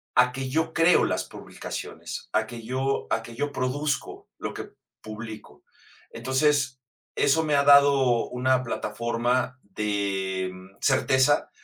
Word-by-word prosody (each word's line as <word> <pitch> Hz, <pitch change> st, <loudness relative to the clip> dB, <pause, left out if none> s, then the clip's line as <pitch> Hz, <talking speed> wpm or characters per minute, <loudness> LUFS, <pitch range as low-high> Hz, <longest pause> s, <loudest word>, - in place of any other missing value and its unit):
A 125 Hz, 0 st, +5 dB
que 130 Hz, 0 st, -4 dB
yo 160 Hz, +3 st, 0 dB
creo 165 Hz, +2 st, +5 dB
las -, -, -1 dB
publicaciones, -, -, -7 dB
a -, -, +1 dB
que 120 Hz, -1 st, -9 dB
yo 135 Hz, +2 st, -1 dB
a 115 Hz, -, +1 dB
que 115 Hz, -, -10 dB
yo 145 Hz, +2 st, -2 dB
produzco 145 Hz, +4 st, -2 dB
lo -, -, -4 dB
que -, -, -8 dB, 0.3 s
publico. 110 Hz, 0 st, -9 dB, 0.5 s
Entonces, 130 Hz, -1 st, +1 dB, 0.4 s
eso 160 Hz, +4 st, +3 dB
me 150 Hz, -, +2 dB
ha 140 Hz, -, +4 dB
dado 140 Hz, -4 st, +5 dB
una 130 Hz, +1 st, +1 dB
plataforma 120 Hz, +3 st, -1 dB
de, 95 Hz, -2 st, -2 dB
mm, 95 Hz, +1 st, -14 dB
certeza 135 Hz, +1 st, +3 dB
130 Hz, 135 wpm, -26 LUFS, 115-140 Hz, 0.5 s, A